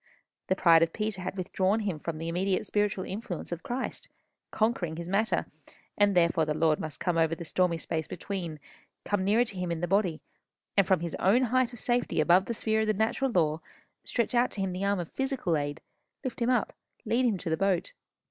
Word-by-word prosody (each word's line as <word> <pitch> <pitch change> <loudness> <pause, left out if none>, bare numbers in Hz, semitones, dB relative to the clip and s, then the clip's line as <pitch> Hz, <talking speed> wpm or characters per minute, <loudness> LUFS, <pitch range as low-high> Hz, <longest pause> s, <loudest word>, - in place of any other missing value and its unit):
The 190 - +2
pride 165 -3 +6
of 165 0 +2
Peter 210 -3 -2
had 185 - -4
withdrawn 190 +3 +1
him 195 -7 -2
from 160 +1 -4
the 165 +1 -5
immediate 185 +3 0
spiritual 205 -2 0
influence 195 -4 -5
of 175 0 -4
Christ, 250 +2 -4 0.4
conquering 215 -8 0
his 170 +1 -6
matter; 205 +5 +1 0.5
and 205 -1 +3
therefore 170 -1 +4
the 155 -1 -1
Lord 155 -1 +2
must 155 -2 -6
come 175 -2 0
over 165 0 +2
the 170 - -8
stormy 180 0 +1
space 160 -1 -3
between, 175 -4 -5 0.5
come 205 -2 0
nearer 215 +5 +3
to 210 - -7
him 180 -1 -2
in 170 - -2
the 175 - -1
body, 185 -4 +1 0.6
and 200 -2 +4
from 190 -4 +3
his 170 -2 -3
own 220 +7 +4
height 255 0 +2
of 240 - -10
safety 240 0 0
above 180 +2 +5
the 235 - -3
sphere 220 0 +1
of 220 - 0
the 215 - +3
natural 220 +6 0
law, 160 -7 +1 0.4
stretch 235 0 -1
out 245 +1 +3
to 200 - -3
him 190 -1 -1
the 185 +2 -3
arm 200 -1 +1
of 170 - -5
physical 265 - -1
aid, 145 0 -3 0.4
lift 255 -2 -5
him 235 - +2
up, 250 - +1 0.3
lead 245 +2 +2
him 215 -5 +1
to 170 - -4
the - - +3
boat. 185 0 0
190 Hz, 215 wpm, -29 LUFS, 170-220 Hz, 0.6 s, pride